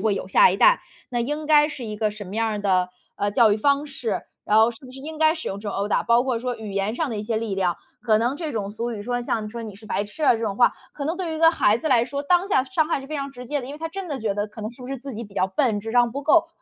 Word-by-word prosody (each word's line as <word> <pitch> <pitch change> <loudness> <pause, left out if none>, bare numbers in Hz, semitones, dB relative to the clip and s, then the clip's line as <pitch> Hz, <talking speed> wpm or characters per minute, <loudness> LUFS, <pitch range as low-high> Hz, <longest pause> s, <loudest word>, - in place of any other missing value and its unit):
会 210 0 +1
有 - - -5
下 - - +6
一 - - -1
代， - - +5 0.3
那 240 -1 -1
应 295 +5 -2
该 300 0 +5
是 265 -5 -6
一 215 -1 -5
个 215 0 0
什 210 0 -8
么 190 +2 -8
样 220 -2 0
的， 185 -2 +1 0.3
呃， 205 - 0
教 215 +1 +5
育 205 - +2
方 280 +5 +2
式。 250 -6 -3 0.2
然 215 - +3
后 225 +2 +5
是 - - -12
不 255 - -11
是 260 - -10
应 310 +3 -7
该 315 0 +4
使 315 - -7
用 200 +1 -4
这 210 - -5
种 - - -4
殴 200 - 0
打， 210 - +1
包 235 +1 +3
括 250 -4 -1
说 250 0 -3
语 215 -3 -7
言 200 +3 -1
上 320 0 -1
的 225 - -4
一 205 - -3
些 225 +1 -2
力 220 -3 -2
量， 180 -3 0 0.3
可 220 -3 +3
能 240 +4 +1
这 310 0 -4
种 205 -3 -3
俗 235 +2 -3
语 220 -3 -5
说 245 +3 -2
像 220 -3 -2
说 235 +2 -6
你 210 -3 -8
是 215 - -13
白 205 - -1
痴 210 +10 -4
啊 - - +6
这 225 - -3
种 210 -4 -2
话， 240 - +5 0.2
可 285 - -5
能 325 +4 -1
对 365 -3 -3
于 320 - -3
一 - - -5
个 325 0 +6
孩 215 -9 +3
子 275 - -5
来 245 -5 +4
说， 280 +3 -4
当 360 +5 +3
下 260 -9 +3
伤 315 +1 0
害 280 - 0
是 270 - -10
非 310 - -6
常 280 -1 -3
直 250 -2 -10
接 290 +3 -1
的。 250 - -8
因 280 - -7
为 295 - -9
他 325 +1 -4
真 380 +2 -6
的 285 -3 -3
觉 215 -4 -1
得 205 +1 -2
可 215 - -11
能 215 - -3
是 250 - -13
不 250 - -8
是 275 - -3
自 265 0 -8
己 230 - -5
比 205 -3 -12
较 185 - +2
笨， 220 +1 +1
智 225 +2 -6
商 240 -1 +4
不 280 +4 -5
够。 325 +2 +4
240 Hz, 370 characters per minute, -23 LUFS, 210-290 Hz, 0.3 s, 下